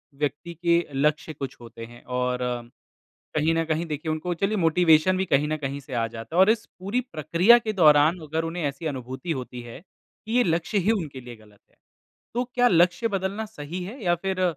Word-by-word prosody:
व्यक्ति 145 +4 -3
के 170 +1 +1
लक्ष्य 150 +2 0
कुछ 135 -2 -6
होते 115 -1 -9
हैं, 120 +1 -15
और 125 0 -1 1.0
कहीं 155 +2 +2
न 165 0 +1
कहीं 160 +1 -1
देखिए, 155 +1 -3
उनको 165 +3 -2
चलिए 200 +5 0
मोटिवेशन 165 +1 +4
भी 190 - 0
कहीं 150 -3 +2
न 155 0 -1
कहीं 140 -1 -4
से 135 -1 -11
आ 115 -1 0
जाता 115 +7 -8
है - - +3
और 190 - +6
इस 220 0 +1
पूरी 200 +7 -1
प्रक्रिया 175 +9 +5
के 220 -2 -3
दौरान, 155 -1 +5
अगर 160 +2 -1
उन्हें 165 +1 -4
ऐसी 140 +3 -3
अनुभूति 130 +4 -5
होती 125 -4 -5
है 120 -1 -10
कि 215 +4 -13
ये 245 - +5
लक्ष्य 170 +5 0
ही 200 +4 +2
उनके 155 -11 -3
लिए 120 -1 -10
गलत 105 -2 -21
है, - - -34 0.6
तो 245 +2 0
क्या 245 0 +5
लक्ष्य 180 +4 +3
बदलना 195 +3 -3
सही 180 -4 -7
है, 220 +6 -8
या 175 -1 +3
फिर 185 +2 -3
165 Hz, 205 wpm, -25 LUFS, 140-185 Hz, 1.0 s, और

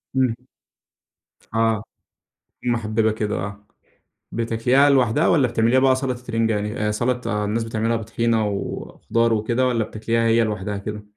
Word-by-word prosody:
امم. 130 -3 +2 1.2
آه، 115 -1 +1 0.8
محببة 110 -2 +1
كده، 105 -1 -2
آه. 100 +1 -6 0.7
بتاكليها 115 +5 +2
لوحدها 135 +2 +3
والّا 145 -7 +4
بتعمليها 115 +2 +2
بقى 130 0 +4
سلطة 130 -2 -3
رنجة 115 0 +2
يعني، 105 +1 -2
آآ، - - +1
سلطة 120 -2 -1
الناس 110 +3 -1
بتعملها 115 +1 -1
بطحينة 115 0 0
وخضار 115 +3 -1
وكده 120 +4 +1
والّا 115 -3 +1
بتاكليها 115 +2 -1
هي 115 0 +4
لوحدها 105 -1 -3
كده؟ 105 +1 -6
115 Hz, 135 wpm, -22 LUFS, 110-120 Hz, 1.2 s, والّا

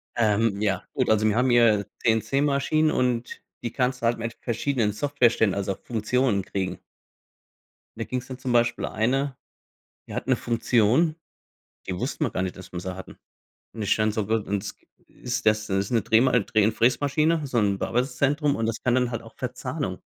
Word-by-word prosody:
Ähm. 110 -2 +2
Ja, 95 -4 0
gut. - - 0
Also, 110 0 +3
wir 105 - +2
haben 125 +2 +2
hier 115 -4 +4 0.2
CNC-Maschinen. 140 +6 +2
Und 125 -3 -1 0.2
die 120 - -3
kannst 125 -1 -1
du - - -1
halt 115 +1 +2
mit 115 0 -5
verschiedenen 120 -2 0
Software-Ständen, 120 -4 +2
also 100 -1 -2
Funktionen, 115 -2 0
kriegen. 95 -1 -3 1.2
Da - - -2
ging 130 - -3
es 125 - -12
dann 130 -1 -7
zum 130 -1 -3
Beispiel 120 0 +2
eine, 135 +5 0 0.7
die - - -8
hat - - -4
'ne - - +3
Funktion, 120 +6 +2 0.7
die 95 - -2
wussten - - -2
wir - - -1
gar - - -2
nicht, 95 - -4
dass 95 -1 -11
wir 90 - -4
sie 95 +1 -5
hatten. 95 - -10 0.6
Und 110 - -6
ich 100 - +2
dann 110 -1 +1
so: 105 -2 -2
„W 110 - +2
und 100 -3 -1
s 105 - -6 0.3
ist 125 -3 -5
das?“ 110 0 +2
Ist 95 0 -1
'ne 115 -3 +2
Dreh 110 +3 +4 0.2
Dreh 110 +1 +2
und 110 - +2
Fräsmaschine, 145 +6 +2
so 130 -3 -1
'n 100 -3 +1
Bearbeitungszentrum. 140 +6 0
Und 115 - -1
das 115 -1 -3
kann 125 - +2
dann 125 -1 +2
halt 115 - -4
auch - - -14
Verzahnung. - - -4
115 Hz, 190 wpm, -25 LUFS, 105-130 Hz, 1.2 s, hier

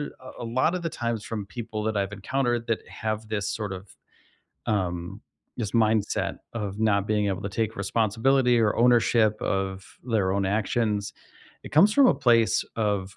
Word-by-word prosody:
a 145 - -3 0.3
a - - -4
lotta 130 +10 +1
the 165 - -2
times 115 -3 -3
from 110 -3 -4
people 110 -2 -5
that 110 -1 -1
I've 100 0 -1
encountered 120 +3 -1
that 115 - +1
have 110 0 -4
this 105 -2 -2
sort 105 -3 -3
of, 95 +1 -10 0.8
um, 90 -4 -2 0.4
this 110 -5 -3
mindset 110 -2 +1 0.2
of 105 -2 -4
not 100 -2 +2
being 105 -1 +1
able 95 +1 -2
to 100 - -3
take 110 +2 -2
responsibility 115 +5 +2
or 105 -2 +2
ownership 115 -3 +3
of 95 -1 -2 0.2
their 105 -6 +1
own 100 -1 0
actions, 105 0 0 0.5
it - - -10
comes 185 +8 +6
from 275 +1 +6
a - - +4
place 115 -2 +3
of 100 -3 -1
110 Hz, 170 wpm, -26 LUFS, 100-115 Hz, 0.8 s, comes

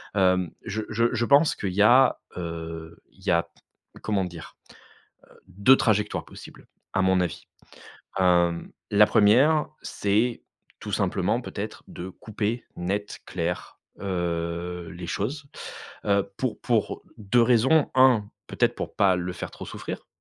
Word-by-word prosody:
hem, 95 -3 +3 0.2
je 110 +3 -3
je 115 +2 +1
je 120 0 +1
pense 145 +5 +5
qu'il 95 -3 -4
y 105 +2 +4
a, 125 +4 +6 0.2
heu, 80 -1 -6
il - - -24
y - - -2
a 85 0 +2 0.5
comment 100 -3 0
dire? 85 -2 -10 0.7
Heu, - - -20
2 100 +8 +5
trajectoires 105 -4 +1
possibles, - - -13 0.3
à 95 - +2
mon 95 0 +3
avis, 90 -3 -2 0.8
hem, 85 -2 +2 0.2
la 105 +1 +7
1re, 125 +10 +4 0.2
c'est 110 +4 0 0.4
tout - - -6
simplement, - - 0
peut-être, - - -6
de 90 - -7
couper 110 +4 -4
net, 100 +4 -3
clair, 90 0 -4 0.2
heu, 85 -2 -3
les 85 -1 -8
choses, 140 +8 -3 0.6
heu, 100 -1 +2
pour 130 -4 -2
pour 115 -5 0 0.2
2 110 +4 +3
raisons. 125 +6 +4
1, 125 -6 +5 0.2
peut-être - - +1
pour - - -5
pas 95 -2 +4
le 90 0 -3
faire - - -6
trop - - -9
souffrir, - - -7
100 Hz, 145 wpm, -25 LUFS, 90-115 Hz, 0.8 s, la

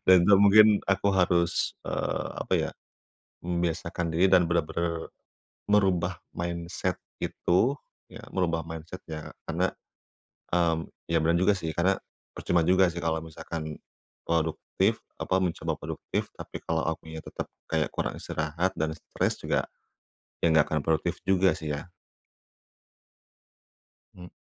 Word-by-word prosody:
Dan 90 -2 +8
itu 100 - +7
mungkin 105 +1 +8 0.2
aku 100 +1 +2
harus, 90 -2 +2
eee, - - -2
apa - - -4
ya, - - 0 0.7
membiasakan 85 0 -1
diri 90 +3 +4
dan 90 -2 +6
bener-bener 85 0 -1 0.6
merubah 95 -4 +3 0.2
mindset 85 0 -2 0.2
itu, 115 +11 +1 0.3
ya - - -11
merubah 85 -3 0
mindset-nya 80 -1 -7 0.2
karena, - - +1 0.9
mmm, 85 -2 +2 0.2
ya 80 - +4
benar 85 +2 +2
juga 95 +3 +4
sih, 85 -5 -3
karena 95 +3 +2 0.3
percuma 85 -1 +1
juga 95 +2 +5
sih 85 - -8
kalau 80 -1 +1
misalkan 80 -1 -6 0.5
produktif, 80 -1 0 0.2
apa, 95 - 0
mencoba 85 -2 -1
produktif, - - -4
tapi - - -7
kalau 80 -1 0
akunya 80 0 -4
tetap - - -6 0.2
kayak 80 -1 0
kurang - - -2
istirahat 80 +4 -1
dan 80 0 0
stres - - -1
juga, - - -1 0.8
ya - - +4
enggak 80 -1 +5
akan 75 -2 0
produktif 80 +2 0
juga 95 -2 +4
sih, 75 -1 -5
ya? 70 - -5 2.3
Mmm. 90 -1 -10
85 Hz, 130 wpm, -28 LUFS, 80-90 Hz, 2.3 s, Dan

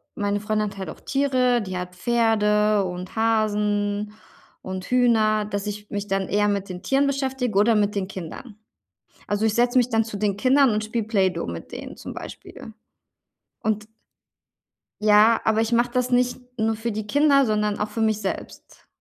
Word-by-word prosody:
meine 205 0 -1
Freundin 215 0 -1
hat 200 - -13
halt 190 - -5
auch - - -9
Tiere, 255 -3 +1
die 185 -3 -5
hat 180 0 -6
Pferde 210 -2 +2
und 180 +2 -6
Hasen 210 -2 0 0.5
und 185 -1 -6
Hühner 220 -4 +3
dass 205 -1 -4
ich 210 0 -6
mich 205 0 -4
dann 195 -1 -1
eher 205 +1 +2
mit 200 -1 -1
den 180 +1 -7
Tieren 275 +6 +2
beschäftige 265 -6 -1
oder 220 +2 +4
mit 210 -1 +1
den 190 -2 -1
Kindern. 195 +5 -8 0.7
Also, 205 +2 0
ich 215 - +1
setze 245 +1 +3
mich 245 - +3
dann 225 -2 +1
zu 220 -2 -6
den 205 -2 0
Kindern 260 +4 +4
und 215 0 -1
spiele 225 0 -2
Play-Doh 190 -6 0
mit 85 -1 -7
denen - - -8
zum - - -8
Beispiel 220 - -10 0.9
und 215 -1 -1 1.1
Ja, 215 +2 +5
aber 220 0 +2
ich 225 +1 -1
mache 240 +1 +2
das 250 +1 0
nicht 245 0 +2 0.2
nur 220 0 +1
für 225 +2 -3
die 210 0 -5
Kinder, 285 0 +4
sondern 210 -1 0
auch 210 - -1
für 225 +2 -4
mich 215 -1 +1
selbst. - - -7
215 Hz, 180 wpm, -23 LUFS, 205-235 Hz, 1.1 s, Ja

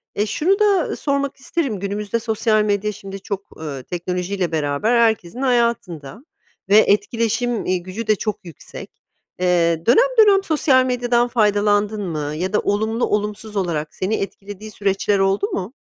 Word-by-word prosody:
E, 205 - +1
şunu 345 - +1
da 400 -5 +2
sormak 280 -1 -1
isterim, 270 - -2
günümüzde 205 +3 -2
sosyal 220 -1 +1
medya, 210 0 0
şimdi, 195 0 -9
çok, 200 0 -7
ııı, 140 -4 -6
teknolojiyle 180 +2 -3
beraber 150 +7 0
herkesin 225 0 +1
hayatında 235 - -1 0.4
ve 205 - +6
etkileşim, 230 +2 +1
eee, 185 - +1
gücü 185 +6 -7
de 215 - +4
çok 210 -1 -4
yüksek. 165 -5 -10 0.5
Eee, 170 -2 +1
dönem - - +4
dönem 390 -1 +4
sosyal 275 -6 +3
medyadan 245 -1 +1
faydalandın 210 -2 +1
mı 150 -3 -3
ya 185 +5 -3
da - - +3
olumlu, 220 +3 0
olumsuz 210 +1 -3
olarak 165 -5 -2
seni 195 +4 -1
etkilediği 205 +1 -7
süreçler 200 0 0
oldu 195 - +1
mu? 200 - -4
210 Hz, 145 wpm, -20 LUFS, 185-235 Hz, 0.5 s, ve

